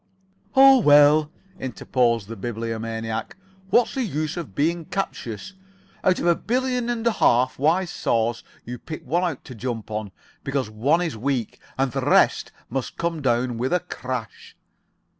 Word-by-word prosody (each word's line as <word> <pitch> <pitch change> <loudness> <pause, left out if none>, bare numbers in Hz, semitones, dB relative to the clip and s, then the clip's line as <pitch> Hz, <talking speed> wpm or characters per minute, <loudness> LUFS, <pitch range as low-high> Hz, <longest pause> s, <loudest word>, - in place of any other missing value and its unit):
"Oh, 270 0 +8
well," 150 -3 +6 0.3
interposed 120 -3 0
the 115 - -7
Bibliomaniac, 115 0 -4 0.3
"what's 235 +4 +3
the 270 - -1
use 155 - -2
of 155 - -7
being 165 +3 0
captious? 150 - -4 0.5
Out 185 -1 +3
of - - -3
a 175 - +5
billion 250 +4 -1
and 235 -1 -2
a 235 - +4
half 125 - +2
wise 165 +5 +2
saws 115 +1 0 0.2
you 125 0 -6
pick 155 +5 -7
out - - -20
one 170 0 0
to 130 - -10
jump 115 -2 -5
on. 105 -2 -4 0.3
Because 135 -5 -2
one 140 +11 +2
is 165 -7 -3
weak, 125 0 -2 0.2
all 135 - +3
the 130 - -3
rest - - +3 0.2
must 130 +1 -4
come 170 -2 -2
down 120 -2 0
with 130 +2 -1
a 180 - +3
crash." 130 -10 -7
135 Hz, 160 wpm, -23 LUFS, 115-175 Hz, 0.5 s, Oh